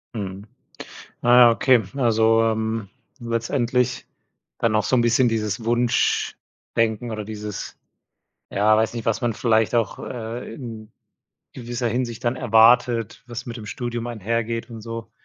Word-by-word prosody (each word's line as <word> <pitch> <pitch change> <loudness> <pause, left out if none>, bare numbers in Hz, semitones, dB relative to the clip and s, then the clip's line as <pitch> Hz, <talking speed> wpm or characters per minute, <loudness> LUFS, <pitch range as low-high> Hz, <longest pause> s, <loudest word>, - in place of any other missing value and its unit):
Mhm. 100 -1 -6 0.7
Naja, 120 0 +7
okay. 120 0 +3
Also, 115 -2 +3
ähm, 110 -1 -1 0.3
letztendlich 120 +1 -1 0.5
dann 115 -2 +1
auch 110 - +2
so 115 - +1
'n 120 - +4
bisschen 120 +2 +3
dieses 110 -1 -2
Wunschdenken 120 -1 -1
oder 110 -1 -5
dieses 105 -1 -6 0.7
ja, 105 +2 +3
weiß 110 +2 +1
nicht, 115 -2 -5
was 115 - +1
man 120 -1 +1
vielleicht 110 0 +2
auch, 115 -4 0
äh, 115 -1 -6
in 115 -3 -9 0.6
gewisser 120 0 -3
Hinsicht 120 0 -3
dann 120 +1 0
erwartet, 115 -1 +3
was 120 0 -6
mit 120 - -6
dem 110 -2 -9
Studium 120 +1 -4
einhergeht 115 +1 -3
und 115 -1 -8
so, 115 0 -7
115 Hz, 140 wpm, -23 LUFS, 110-120 Hz, 0.7 s, Naja